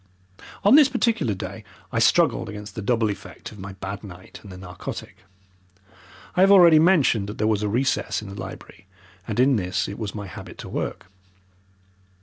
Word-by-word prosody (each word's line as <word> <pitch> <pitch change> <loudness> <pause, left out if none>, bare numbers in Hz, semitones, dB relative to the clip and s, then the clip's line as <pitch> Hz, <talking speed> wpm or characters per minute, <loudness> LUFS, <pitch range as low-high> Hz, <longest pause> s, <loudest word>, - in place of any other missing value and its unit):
On 205 - +6
this 290 -1 +7
particular 230 - 0
day 95 - -7 0.3
I - - 0
struggled 115 - +3
against 105 0 -8
the 110 - -5
double 115 0 +1
effect 100 - -9
of 105 - -13
my 95 +1 -7
bad 95 +2 -7
night 95 -2 -11
and 100 - -12
the 90 - -9
narcotic. 90 -1 -8 1.2
I 180 - +3
have 195 - +6
already 170 -5 +8
mentioned 155 - +3
that 105 - -7
there 110 - 0
was 110 -2 +1
a 105 - -1
recess 130 +5 0
in 105 - -9
the 100 - -8
library, 95 0 -10 0.4
and 110 +1 -3
in 130 0 +4
this 90 -2 -1
it 100 - -7
was 105 -2 -5
my 105 -1 -5
habit 90 - -10
to - - -9
work. - - -4
105 Hz, 185 wpm, -24 LUFS, 100-135 Hz, 1.2 s, already